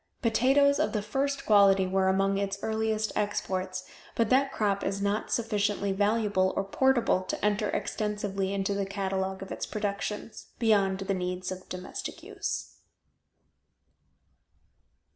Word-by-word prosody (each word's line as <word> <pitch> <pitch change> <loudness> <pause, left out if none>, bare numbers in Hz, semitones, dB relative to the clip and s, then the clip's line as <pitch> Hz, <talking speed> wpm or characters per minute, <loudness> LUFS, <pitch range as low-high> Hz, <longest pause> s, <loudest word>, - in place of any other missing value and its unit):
Potatoes 270 +5 +4
of 310 - +1
the 210 - 0
first 275 +4 -1
quality 200 -2 +5
were 190 0 +1
among 195 +1 +2
its 200 0 -2
earliest 220 0 0
exports, 185 -2 -2 0.3
but 230 0 +1
that 270 +1 +4
crop 200 -4 0
is 195 0 -1
not 200 +2 -1
sufficiently 205 -3 0
valuable 205 -1 +1
or 195 - +2
portable 240 0 +2
to 185 - -3
enter 210 0 +1
extensively 205 -2 -2
into 200 0 -1
the 200 -1 -1
catalogue 190 -1 -2
of 195 - -10
its - - -4
productions, 210 +1 -4
beyond 195 -4 +2
the 195 0 -1
needs 180 0 -3
of 185 0 -8
domestic 185 0 -6
use. - - -4
200 Hz, 135 wpm, -28 LUFS, 195-220 Hz, 0.3 s, quality